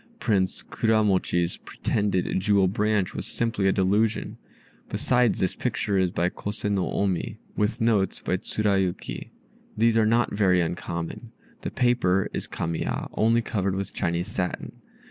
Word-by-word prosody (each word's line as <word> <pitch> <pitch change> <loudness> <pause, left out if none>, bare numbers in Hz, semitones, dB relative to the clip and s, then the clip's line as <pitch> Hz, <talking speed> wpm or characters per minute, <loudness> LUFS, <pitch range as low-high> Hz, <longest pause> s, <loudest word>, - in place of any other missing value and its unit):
Prince 95 - 0
Kuramochi's 95 -6 +1
pretended 100 -3 -1
jewel 100 0 +3
branch 105 0 +1
was - - -5
simply 115 -4 0
a - - +5
delusion. 105 +4 +1 0.5
Besides, 125 -3 +2
this 95 - 0
picture 100 -2 -1
is 95 -1 +2
by 85 +1 0
Kose 105 +3 -6
no 100 -3 0
Omi, 100 +1 -1 0.2
with 105 +3 0
notes 110 -5 +2
by 90 - -1
Tsurayuki. 95 - -1 0.5
These 115 +1 +4
are 110 -1 +4
not 115 +2 +2
very 95 -3 +3
uncommon. 85 -1 -4 0.3
The - - -3
paper 120 -7 +2
is - - -4
Kamiya, 80 0 -3
only 115 +2 +3
covered 100 -4 -1
with 100 0 -4
Chinese 85 0 -1
satin. 90 -1 -4
100 Hz, 140 wpm, -26 LUFS, 90-110 Hz, 0.5 s, a